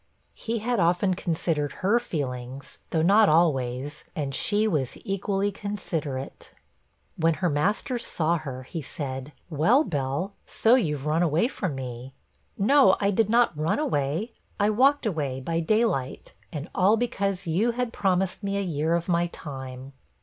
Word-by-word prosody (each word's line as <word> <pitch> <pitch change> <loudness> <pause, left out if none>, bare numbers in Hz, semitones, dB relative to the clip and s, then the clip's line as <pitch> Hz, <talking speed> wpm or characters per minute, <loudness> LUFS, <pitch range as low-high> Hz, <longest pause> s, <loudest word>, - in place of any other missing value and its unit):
He 230 +1 -3
had 235 +1 -1
often 180 +2 +2
considered 165 -4 -1
her 225 +5 +4
feelings, 130 - -5
though 160 -1 +1
not 205 +4 +6
always, 145 -3 +1
and 140 -3 -3
she 210 +8 +1
was 145 - -1
equally 195 +1 -1
considerate. 165 -10 -5 0.6
When 165 -1 +2
her 175 -2 0
master 205 - 0
saw 170 -6 0
her, 130 -4 -7
he 160 +5 -6
said, 135 -1 -5 0.2
'Well, 200 - +4
Bell, 145 - -2
so 225 - +3
you've 150 - +1
run 155 +2 +1
away 170 +5 +2
from 185 - -3
me.' 130 0 -7 0.4
'No, 225 -1 +5
I 200 0 +2
did 210 +1 +2
not 235 -6 +3
run 155 +2 0
away; 205 - -1 0.3
I 205 +1 +3
walked 270 +5 +3
away 145 -10 -2
by 165 +5 -2
day 215 +7 +3
light, 135 - -3 0.2
and 150 0 -5
all 200 +4 +4
because 200 -5 -1
you 195 +9 +1
had 245 -1 -2
promised 190 -1 0
me 200 -1 -2
a - - 0
year 165 -2 0
of 170 0 -2
my 175 -1 +2
time.' 135 -4 -8
170 Hz, 155 wpm, -26 LUFS, 145-205 Hz, 0.6 s, not